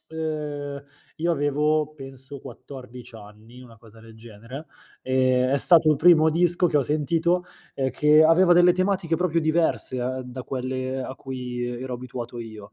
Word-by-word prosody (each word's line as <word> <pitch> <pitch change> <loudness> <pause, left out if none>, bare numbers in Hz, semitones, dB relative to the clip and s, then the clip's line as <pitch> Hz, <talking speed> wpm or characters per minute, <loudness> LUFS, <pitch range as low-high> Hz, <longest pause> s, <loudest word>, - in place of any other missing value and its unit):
ehm, 150 -3 -5 0.3
io 170 +2 0
avevo 150 +1 0
penso 135 0 -10
14 125 -1 -12
anni, 110 +4 -15
una 115 -3 -16
cosa 115 -1 -18
del 115 0 -15
genere, 115 +6 -11 0.3
ehm, 130 -1 +1
è - - +3
stato 160 +2 +5
il 150 - +2
primo 160 0 +5
disco 175 +2 +2
che 165 -3 0
ho 145 - +3
sentito, 165 +5 0 0.3
ehm, 135 -1 -1
che 150 +4 +4
aveva 170 +3 +5
delle 175 +1 +6
tematiche 185 -3 0
proprio 170 -1 0
diverse, 160 -4 0
eh, 130 +1 -3
da 125 0 -8
quelle 130 0 -4
a 130 - -7
cui 125 -2 -6 0.2
ero 130 -1 -5
abituato 120 -1 -7
io. 110 -3 -10
135 Hz, 160 wpm, -24 LUFS, 125-160 Hz, 0.3 s, delle